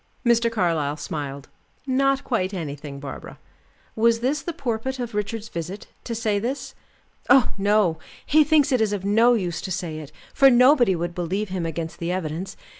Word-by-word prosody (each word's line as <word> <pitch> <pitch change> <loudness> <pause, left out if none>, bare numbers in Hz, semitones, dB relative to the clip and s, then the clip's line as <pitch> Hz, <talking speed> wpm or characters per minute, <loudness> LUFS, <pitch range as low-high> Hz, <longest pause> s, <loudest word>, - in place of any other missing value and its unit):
Mr. 235 -1 +3
Carlyle 165 -8 0
smiled. 140 -2 -5 0.4
"Not 275 +1 +1
quite 195 -6 -1
anything, 145 -4 -6
Barbara. 140 -1 -8 0.6
Was 230 +1 +3
this 280 +5 0
the 340 - -4
purport 265 -4 -3
of 240 -2 -5
Richard's 210 +1 -3
visit 180 +5 -6 0.2
to 230 - -3
say 215 -3 0
this?" 250 +6 -4 0.6
"Oh, 270 -4 +5
no! 200 -5 +2 0.3
He 310 +1 +5
thinks 300 -2 +3
it 255 -3 +2
is 215 -2 +1
of 195 -2 -3
no 230 +4 +4
use 180 -6 -2
to - - -6
say 175 -4 -3
it, 155 -1 -10 0.2
for 275 -1 +6
nobody 250 -4 +5
would 170 +1 -3
believe 185 +4 -2
him 180 -3 -2
against 165 0 -5
the 170 +1 -2
evidence. 180 0 -4
205 Hz, 175 wpm, -23 LUFS, 170-240 Hz, 0.6 s, for